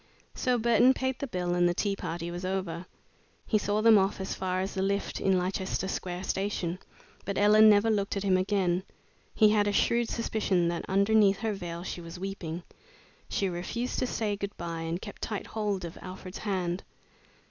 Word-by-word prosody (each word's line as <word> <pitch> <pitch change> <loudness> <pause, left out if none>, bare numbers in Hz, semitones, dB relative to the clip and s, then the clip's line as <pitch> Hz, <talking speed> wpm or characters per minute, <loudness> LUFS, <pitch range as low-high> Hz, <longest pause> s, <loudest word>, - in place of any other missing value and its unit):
So 250 -1 +1
Burton 240 +3 +4
paid 260 -1 -2
the 280 - -3
bill 180 -6 -2
and 175 0 +3
the 175 - -1
tea 200 +1 0
party 170 -2 -4
was 175 +1 -6
over. 185 -2 -3 0.6
He 215 - +2
saw 205 +1 0
them 225 -2 +8
off 195 +1 0
as 190 - -3
far 185 -1 -2
as 190 +1 -2
the 190 - -2
lift 200 +1 -1
in 190 -1 +3
Leicester 190 +1 -1
Square 180 -1 -4
Station, 190 -3 -2 0.4
but 200 - -3
Ellen 215 +2 +7
never 210 +2 +5
looked 200 -1 0
at 200 - -2
him 190 -2 +3
again. 185 -1 +1 0.5
He 215 -2 +6
had 210 -1 +3
a - - +2
shrewd 235 +3 +2
suspicion 195 -6 0
that 170 0 -3
underneath 200 0 +4
her 220 -2 0
veil 175 -3 -6
she 180 - -5
was 170 +1 -9
weeping. 180 -3 -5 0.7
She 195 - 0
refused 190 +8 -3
to 255 - 0
say 215 -4 -1
good 200 0 -5
bye 165 -1 -4
and 165 +1 -2
kept 205 0 -9
tight 210 -3 -3
hold 205 -4 -2
of 170 - -8
Alfred's 185 +1 -8
hand. 185 -3 -2
195 Hz, 190 wpm, -29 LUFS, 180-210 Hz, 0.7 s, them